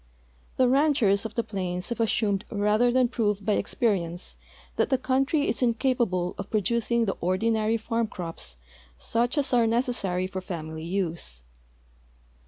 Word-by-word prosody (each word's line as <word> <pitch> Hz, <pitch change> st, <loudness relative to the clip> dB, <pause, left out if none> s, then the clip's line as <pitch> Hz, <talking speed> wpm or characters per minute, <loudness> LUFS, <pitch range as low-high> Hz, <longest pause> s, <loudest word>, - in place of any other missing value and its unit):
The 255 Hz, -, +4 dB
ranchers 255 Hz, -7 st, +3 dB
of 220 Hz, -, -17 dB
the 235 Hz, -, +1 dB
plains 185 Hz, -2 st, -3 dB
have 235 Hz, -, -3 dB
assumed 210 Hz, -3 st, +1 dB
rather 215 Hz, +3 st, +2 dB
than 255 Hz, 0 st, +3 dB
i)roved 210 Hz, -4 st, -1 dB
by 210 Hz, -1 st, +2 dB
exjierience 180 Hz, -7 st, -1 dB, 0.4 s
that -, -, +1 dB
the 265 Hz, -, +3 dB
country 270 Hz, +3 st, +1 dB
is 235 Hz, -, -1 dB
incapa 245 Hz, 0 st, +2 dB
ble 180 Hz, -1 st, -1 dB
of 200 Hz, -, -5 dB
producing 235 Hz, +2 st, +1 dB
the 195 Hz, -, -1 dB
ordinary 220 Hz, +5 st, +1 dB
farm 230 Hz, 0 st, -1 dB
crops, 165 Hz, -, -7 dB, 0.4 s
such 240 Hz, -, 0 dB
as 280 Hz, -2 st, +1 dB
are 235 Hz, -2 st, +4 dB
necessary 225 Hz, -6 st, 0 dB
for 190 Hz, 0 st, -5 dB
family 160 Hz, -3 st, -6 dB
use. 170 Hz, -, -3 dB
215 Hz, 150 wpm, -26 LUFS, 185-240 Hz, 0.4 s, The